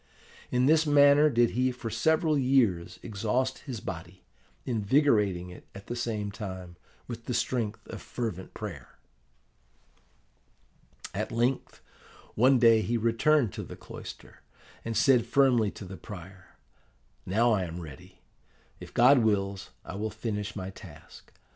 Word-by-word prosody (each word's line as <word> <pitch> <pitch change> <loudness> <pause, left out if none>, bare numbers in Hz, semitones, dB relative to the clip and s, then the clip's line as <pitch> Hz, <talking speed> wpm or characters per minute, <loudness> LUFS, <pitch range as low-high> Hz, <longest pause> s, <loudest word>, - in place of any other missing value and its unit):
In 125 +1 +2
this 155 +2 +4
manner 145 +1 +6
did 120 -3 +3
he 130 +2 +1
for 120 -2 -6
several 155 +7 +2
years 125 -11 +2
exhaust 115 +5 -1
his 130 -6 -7
body, 90 +1 -8 0.4
invigorating 105 - +1
it, 90 - -13
at 100 - -10
the 120 - -5
same 110 -4 -3
time, 95 -4 -7 0.3
with 115 -1 -7
the 125 - -2
strength 115 -4 -2
of - - -8
fervent 105 -7 -5
prayer. 85 - -8 2.2
"At - - -3
length, 120 +3 -1 0.5
one 130 +4 +4
day 115 -2 +5
he 115 +2 -1
returned 115 - +2
to - - -5
the - - -9
cloister, - - -11 0.4
and 115 -1 -3
said 130 -4 +4
firmly 125 -6 +3
to 100 - -10
the 95 +1 -9
prior, 95 -2 -11 0.7
'Now 115 +5 +3
I 100 -4 +1
am 85 +1 -7
ready. 75 -6 -12 0.6
If - - -12
God 125 +3 +6
wills, 100 -4 0 0.2
I - - -7
will 105 +3 -3
finish 105 -1 -4
my 95 -1 -5
task. 90 -6 -14
115 Hz, 140 wpm, -28 LUFS, 100-125 Hz, 2.2 s, manner